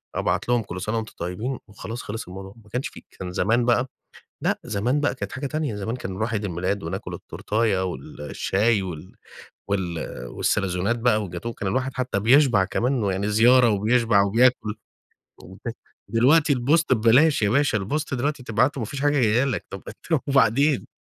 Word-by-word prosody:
أبعَت - - -1
لهُم: 120 -2 +2
"كل 90 -2 -7
سنة 110 +4 -1
وأنتم 110 -1 -5
طيِّبين" 105 +10 -3
وخلاص 110 +3 -7
خلص 110 -1 -6
الموضوع. 95 +2 -9
ما 105 - -20
كانش 125 +5 -2
في - - -13 0.2
كان 90 -1 -5
زمان 115 +7 +2
بقى 120 +1 +2 0.5
لأ، - - 0
زمان 120 +8 0
بقى 145 -3 0
كانت - - -5
حاجة 140 +2 -4
تانية، 150 -5 -2
زمان 105 +4 -3
كان 95 -6 -6
نرُوح 110 +4 -2
عيد 105 -1 -1
الميلاد، 95 +2 -2
وناكُل - - -5
التورتاية 105 -3 -1
والشاي 90 - -1
وال 90 -1 -8 0.6
وال 90 -4 -1 0.3
والساليزونات 100 - 0
بقى، 115 -2 +2
والجاتوه 90 +3 -5
والكلام 100 -4 -3
ده، 130 - +2
الواحد 135 0 -4
حتى 125 -6 -1
بيشبع 120 -3 +5
كمان 120 +5 0
ويعني 100 +1 -1
زيارة 120 +3 +5
وبيشبع 110 0 +3
وبياكُل 110 +1 +2 0.7
وكده. - - -8 0.3
دلوقتي 140 +7 +4
الpost 145 +7 +2
ببلاش 125 +6 +4
يا 100 - +3
باشا، 140 -2 +2
الpost 130 +9 -2
دلوقتي 145 +2 -2
تبعَتُه 125 +5 +1
ما - - -1
فيش 140 +3 -5
حاجة 145 - +3
جاية 115 +2 +3
لك، 130 -6 -2
طب 95 - -7 0.3
طب 160 -4 +3
وبعدين؟ 140 +1 +3
115 Hz, 175 wpm, -24 LUFS, 100-130 Hz, 0.7 s, بيشبع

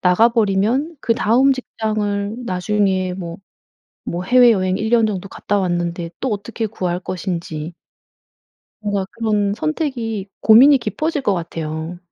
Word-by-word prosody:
나가버리면 225 - +2
그다음 235 +4 +3
직장을 215 -4 -2
나중에 190 -1 0
뭐 170 -2 -6 0.7
뭐 175 +1 -3
해외여행 220 -6 +4
1 215 +2 -2
년 230 -1 +4
정도 195 -2 -4
갔다 205 0 -1
왔는데 175 -2 -2
또 265 - -2
어떻게 220 +2 -4
구할 180 -4 -3
것인지. 170 -3 -5 1.1
뭔가 205 -2 -2
그런 210 -3 0
선택이 235 - -3
고민이 265 +6 +7
깊어질 305 +4 -2
것 205 - +2
같아요. 165 0 -5
205 Hz, 270 characters per minute, -19 LUFS, 180-230 Hz, 1.1 s, 고민이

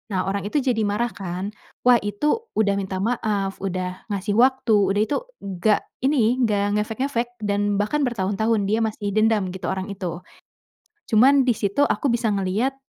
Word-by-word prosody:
Nah, 185 +1 0
orang 200 0 -3
itu 275 +5 0
jadi 245 -4 +1
marah 235 +4 0
kan. 190 +1 -5 0.3
Wah, 245 -2 +6
itu 295 - -1
udah 200 -2 +2
minta 190 0 -3
maaf, 210 -4 -1
udah 185 -1 -4
ngasih 200 +2 -3
waktu, 260 -3 +4 0.2
udah 205 - +2
itu 285 - -1 0.3
nggak 200 +2 +1 0.2
ini, 255 -3 +2
nggak 205 -3 +1
ngefek-ngefek. 240 +2 -2
Dan 205 0 0
bahkan 210 +9 0
bertahun-tahun 215 -1 0
dia 215 +3 +1
masih 215 -2 -2
dendam 215 -3 +2
gitu 190 - -6
orang 190 +1 -3
itu. 180 -2 -5 0.9
Cuman 260 +4 +5
di 235 - +3
situ 200 +6 -1
aku 285 -2 +2
bisa 235 -1 0
ngelihat, 210 +7 0
210 Hz, 165 wpm, -23 LUFS, 195-240 Hz, 0.9 s, Wah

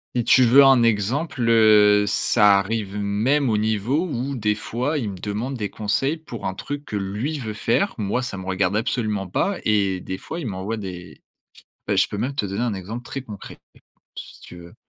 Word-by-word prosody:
si 120 - +1
tu 130 +2 +5
veux 135 +4 +7
un 135 -3 +6
exemple, 115 - 0
heu, 105 -2 +5
ça 105 -1 +4
arrive 100 0 -2
même 115 +7 +1
au 110 - +2
niveau 110 - 0
où 140 -2 -3
des 105 -2 0
fois 125 +8 -2
il 115 -7 -2
me 95 - -9
demande 110 +8 -4
des 105 -3 -3
conseils 110 +9 -1
pour 125 -8 -7
un 95 - -2
truc 145 0 -6
que 105 - -6
lui 105 +10 -3
veut 110 -6 -5
faire, 120 - 0
moi 110 +3 -1
ça 120 -6 -5
me 95 - -7
regarde 95 +1 0
absolument 110 -4 -2
pas 195 - -1
et 100 -3 +1
des 95 +1 -6
fois, 165 - -7
il 150 - -5
m'envoie 100 +3 -4
des 90 -3 -8 0.7
bah, - - 0
je - - +3
peux 105 - -5
même 130 +6 -2
te 105 - -1
donner 100 +4 -3
un 120 -4 -1
exemple 110 +6 -7
très 135 - -5
concret, 105 -6 -10 0.6
si - - -10
tu - - -12
veux. 85 0 -13
110 Hz, 205 wpm, -22 LUFS, 100-125 Hz, 0.7 s, veux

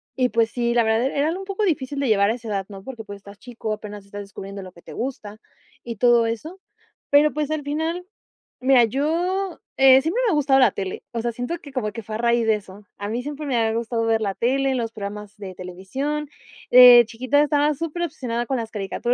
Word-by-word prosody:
y, 255 -2 +1
pues 230 -1 +1
sí, 235 -1 0
la 235 -1 +3
verdad, 220 +3 +1
era 285 +2 0
algo 360 +3 -3
un 385 - -7
poco 395 +2 -3
difícil 285 -6 -1
de 275 - 0
llevar 200 -1 +3
a - - +2
esa 230 -2 -10
edad, 195 -2 -2
¿no? 195 -1 -10
Porque, 240 -4 -8
pues, 205 -1 -9
estás 200 0 -14
chico, 235 -3 -5
apenas 210 -2 -8
estás 205 +1 -8
descubriendo 195 0 -8
lo 185 -1 -10
que 170 - -18
te - - -11
gusta 220 -5 -5 0.5
y 235 -1 -6
todo 240 0 +4
eso, 310 - -5 0.5
pero, 295 +1 +5
pues, 300 0 -2
al 310 -1 -1
final, 320 +5 -2 0.5
mira, 255 -2 +5
yo, 340 - -1 0.2
eh, 265 0 +7
siempre 340 - -1
me - - +3
ha - - +1
gustado 275 -2 +3
la 255 - +5
tele, 190 -1 -5
o 230 - -2
sea, 235 0 -1
siento 245 +9 -4
que 285 - -12
como 215 -5 -2
que 230 -1 -7
fue 215 0 -6
a - - -1
raíz 235 0 +2
de 220 - +4
eso. 200 0 -11
A 205 - -5
mí 235 +3 -2
siempre 295 +1 -6
me 265 -3 -1
ha 225 -1 +1
gustado 230 0 -1
ver 225 -1 +2
la 200 -2 -1
tele, 265 +4 +1
los 230 -2 -2
programas 210 0 -7
de 190 -3 -8
televisión. 265 +12 -4 0.4
De 245 -1 +10
chiquita 255 +6 +1
estaba 295 0 +2
superobsesionada 295 -7 -3
con 265 +1 -1
las 225 -1 -5
caricaturas 210 +4 -2
240 Hz, 230 wpm, -23 LUFS, 215-285 Hz, 0.5 s, De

